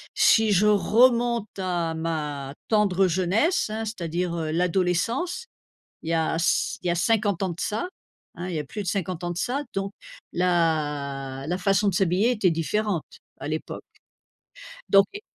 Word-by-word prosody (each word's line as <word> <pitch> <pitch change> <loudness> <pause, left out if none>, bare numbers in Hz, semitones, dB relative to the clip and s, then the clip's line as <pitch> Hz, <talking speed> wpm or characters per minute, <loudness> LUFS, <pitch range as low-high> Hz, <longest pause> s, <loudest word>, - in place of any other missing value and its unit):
si 230 - +5
je 200 +2 +4
remonte 235 +2 +3
à 175 -3 -1
ma 150 -4 -3 0.2
tendre 195 -3 +3
jeunesse, 200 - +1
hein, 220 +1 -3
c'est-à-dire, 175 -4 -3
heu, 160 -2 -2
l'adolescence, 180 - 0 0.6
il 160 - -4
y - - +2
a 160 0 +1
c 165 - +1
il - - -6
y - - +2
a - - +2
50 205 0 +1
ans 185 - 0
de 170 - -7
ça, 220 +12 -2 0.5
hein, 175 +2 -6
il 175 - -4
y - - 0
a 150 - -3
plus 210 +9 -6
de - - -9
50 180 -2 -2
ans 175 - -2
de 175 - -5
ça, 270 +7 -1
donc, 195 +1 -2 0.4
la 145 -6 0
la 180 +3 -1
façon 195 +2 +2
de 190 - 0
s'habiller 190 +6 +2
était 205 -7 +2
différente, 175 +2 -1 0.4
à - - -5
l'époque. - - -4 1.1
Donc 195 0 +7
et 410 - -6
180 Hz, 170 wpm, -25 LUFS, 165-210 Hz, 1.1 s, Donc